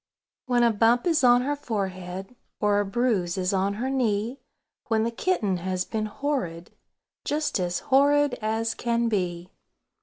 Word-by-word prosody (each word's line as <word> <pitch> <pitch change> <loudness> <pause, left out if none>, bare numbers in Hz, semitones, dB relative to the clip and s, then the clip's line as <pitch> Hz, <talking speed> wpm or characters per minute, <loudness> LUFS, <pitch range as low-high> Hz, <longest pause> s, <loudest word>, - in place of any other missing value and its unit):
When 245 -1 +3
a 235 - +5
bump 230 +3 +3
is 330 -5 +2
on 245 0 +6
her 290 +2 -1
forehead, 195 -5 -5 0.2
Or 205 -1 +2
a 205 - 0
bruise 195 -5 0
is 185 +1 0
on 195 +1 0
her 240 +5 -3
knee; 235 0 0 0.5
When 220 -2 +2
the 230 - -1
kitten 230 - 0
has 185 +1 -2
been 215 -1 -2
horrid, 200 - -3 0.5
"Just 300 -6 -1
as 175 -1 -1
horrid 285 +1 +3
as 220 +1 -1
can 235 -1 0
be!" 180 -4 -2
220 Hz, 155 wpm, -26 LUFS, 190-250 Hz, 0.5 s, on